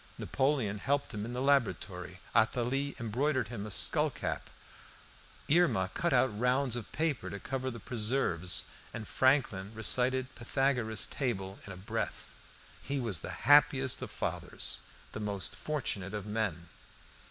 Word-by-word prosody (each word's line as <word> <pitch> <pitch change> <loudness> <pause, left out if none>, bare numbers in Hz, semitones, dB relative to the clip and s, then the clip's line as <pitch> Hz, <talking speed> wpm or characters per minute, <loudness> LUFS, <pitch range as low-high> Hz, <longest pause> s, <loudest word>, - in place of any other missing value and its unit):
Napoleon 130 -7 0
helped 140 +4 0
him 105 0 -3
in 120 - -5
the 125 +1 -2
laboratory, 95 - +1 0.2
Athalie 125 +5 +2
embroidered 125 +2 0
him 110 -3 -5
a - - -6
skullcap, 95 - +1 1.0
Irma 145 - +3
cut 170 0 0
out 110 -5 +3
rounds 125 0 +2
of 120 -4 -6
paper 155 -6 -1
to 100 - -6
cover 130 +5 -3
the 115 -2 -7
preserves, 105 -6 0 0.3
and 110 -2 -5
Franklin 125 -8 +2
recited 130 +3 +1
Pythagoras' 120 -3 0
table 95 -8 -3
in - - -6
a 90 - -8
breath. 95 - -4 0.5
He 140 0 -2
was 110 - -1
the - - -6 0.2
happiest 135 -2 +5
of - - -4
fathers, - - -2 0.3
the - - -5
most 100 -2 -2
fortunate 105 -10 -2
of 105 -2 -4
men. 105 -6 -2
120 Hz, 140 wpm, -32 LUFS, 105-135 Hz, 1.0 s, happiest